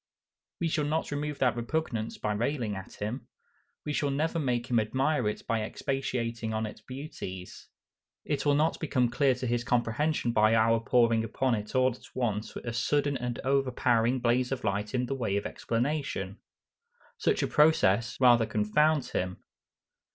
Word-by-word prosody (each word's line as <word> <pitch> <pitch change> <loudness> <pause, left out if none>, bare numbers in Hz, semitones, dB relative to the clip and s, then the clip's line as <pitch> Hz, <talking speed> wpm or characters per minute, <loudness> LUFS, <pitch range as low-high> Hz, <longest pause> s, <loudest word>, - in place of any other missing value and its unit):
We 170 - +1
shall 155 -2 0
not 155 +1 -1
remove 145 0 -3
that 125 -3 +2
repugnance 120 -2 -2
by 105 - -1
railing 115 -1 -1
at 95 0 -8
him. 110 +6 -5 0.6
We 150 - -2
shall 145 -1 0
never 155 +4 0
make 125 -5 0
him 120 - +4
admire 130 +2 +1
it 105 - -6
by 115 -1 0
expatiating 115 -2 -2
on 110 0 -1
its 105 0 -8
beauties. 110 -8 -8 0.6
It 145 -2 -1
will 145 -1 +3
not 155 +2 +1
become 125 -6 +1
clear 135 0 +3
to 125 - -5
his 120 0 0
comprehension 120 +3 0
by 110 0 +4
our 115 +1 +4
pouring 115 -1 +3
upon 125 +3 0
it 105 +2 -4
all 130 0 +4
at 125 - -16
once 110 -4 -2
a 120 - -5
sudden 145 +4 +1
and 125 -1 -3
overpowering 130 -2 +2
blaze 125 +1 +1
of 130 -2 -3
light 105 +4 -1
in 125 0 +1
the 135 - -3
way 110 -7 -1
of 100 - -3
explanation. 120 -6 -2 0.8
Such - - +1
a - - +1
process 115 -8 +3
rather 120 -3 +5
confounds 130 +8 +2
him. 90 0 -3
120 Hz, 165 wpm, -29 LUFS, 110-140 Hz, 0.8 s, rather